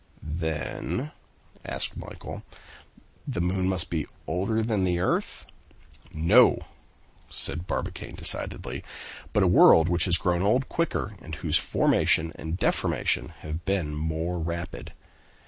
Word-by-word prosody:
"Then," 80 - -3 0.5
asked - - -3
Michel, - - -8 0.9
"the - - -2
moon 90 +1 +1
must 95 -3 -2
be 80 -4 -1 0.2
older 100 +8 0
than 110 -4 0
the 90 -1 +1
earth?" 95 - -1 0.7
"No!" 95 +11 +5 0.7
said 85 +3 -2
Barbicane - - -4
decidedly, - - -2 0.5
"but - - +3
a - - +4
world 80 +1 +7
which 85 -1 +3
has 90 -2 +5
grown 85 +1 +1
old 125 +7 +2
quicker, 165 -10 -1
and 80 - -7
whose 80 +1 +2
formation 80 +2 +2
and 80 +2 -5
deformation - - 0
have 80 +2 -5
been 95 -6 -1
more 80 +3 -2
rapid. 85 +1 -5
85 Hz, 125 wpm, -27 LUFS, 80-95 Hz, 0.9 s, world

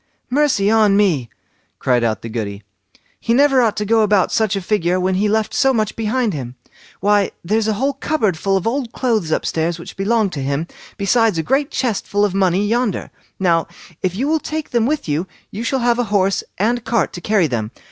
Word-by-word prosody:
"Mercy 265 -8 +2
on 215 -3 +4
me", 165 - +2 0.5
cried 125 -2 +1
out 110 -2 -1
the - - -5
Goody; 105 -3 -5 0.6
"he 230 - 0
never 270 -1 +4
ought 225 -3 +1
to 210 - -1
go 225 +1 +3
about 205 -3 +3
such 220 -3 +1
a - - 0
figure 180 -2 0
when 185 +1 0
he 205 +3 +1
left 215 0 0
so 270 -2 +3
much 215 -2 -1
behind 225 0 0
him. 125 -4 -6 0.5
Why, 205 0 +3 0.2
there's 215 +4 +1
a 220 - +2
whole 270 +7 0
cupboard 270 - 0
full 195 +4 0
of 190 - -4
old 240 0 -2
clothes 220 -10 0
up - - 0
stairs 165 +1 -1
which 170 - -10
belonged 200 0 +1
to 140 - -4
him, 140 +4 -1 0.3
besides 215 0 +2
a 160 - 0
great 275 - +1
chest 235 -6 -2
full 205 +1 +2
of 200 - -2
money 190 0 +2
yonder. 235 0 -1 0.3
Now, 170 -3 +2 0.3
if 185 -1 -1
you 260 +7 -1
will 315 +1 +2
take 310 0 -5
them 235 -1 +2
with 300 - -1
you, 155 +5 -1 0.2
you 215 +4 -5
shall 260 +1 0
have 240 0 +2
a 245 - +1
horse 195 -2 +1
and 230 +4 0
cart 230 -4 0
to 175 - -7
carry 205 -2 +2
them. 115 -7 -2
210 Hz, 215 wpm, -19 LUFS, 180-235 Hz, 0.6 s, on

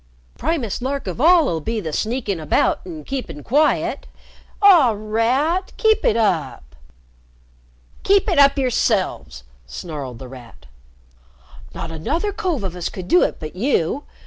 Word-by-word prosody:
Primest 250 - -2
lark 275 +2 -3
of 190 +5 -5
all 335 +1 +6
'll 165 - -1
be 225 +8 -3
the 160 -6 -5
sneakin' 215 - -2
about 155 - +1
an' 160 -4 -8
keepin' 250 - -6
quiet. 295 +5 +1 0.5
Aw, 340 - +6
Rat! 250 - 0
Keep 440 -1 +2
it 220 - +2
up!" 140 - -1 1.3
"Keep 395 0 +3
it - - +2
up 280 0 +5
yourselves!" 215 - -1 0.2
snarled 135 - -7
The 130 - -9
Rat. 120 - -13 1.1
"Not 165 - -6
another 325 - -2
cove 365 - -2
of 185 -2 -4
us 180 - -3
could 185 -2 -8
do 180 -1 +4
it - - 0
but 155 +1 -8
you! 235 - 0
220 Hz, 145 wpm, -20 LUFS, -, 1.3 s, all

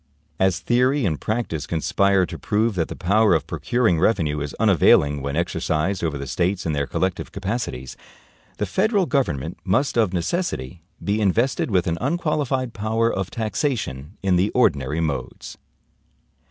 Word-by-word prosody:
As 95 -2 +2
theory 125 +2 +2
and 80 -5 -1
practice 105 -10 -2
conspire 95 +3 +2
to - - -8
prove 110 +2 +1
that 85 -4 -1
the - - -7
power 100 +1 +3
of 80 - -1
procuring 115 -9 +1
revenue 80 -7 +1
is 70 -1 -5
unavailing 70 -1 +4
when 70 +1 -3
exercised 85 +2 -1
over 80 -3 -1
the 70 - -5
States 90 +7 -1
in 80 - 0
their 70 -1 -1
collective 95 -1 -2
capacities, 100 - -4 0.6
the 105 - -1
federal 205 - +1
government 85 - -1
must 120 +6 +1
of 110 -5 +3
necessity 90 - -2 0.2
be 105 +2 0
invested 115 +8 +1
with 95 -5 +2
an 85 0 -1
unqualified 140 -4 -1
power 115 +2 0
of 95 -1 -2
taxation 105 - -3
in 95 -2 +3
the 95 +4 +2
ordinary 80 - +2
modes. 70 -6 -4
95 Hz, 155 wpm, -22 LUFS, 80-115 Hz, 0.6 s, unavailing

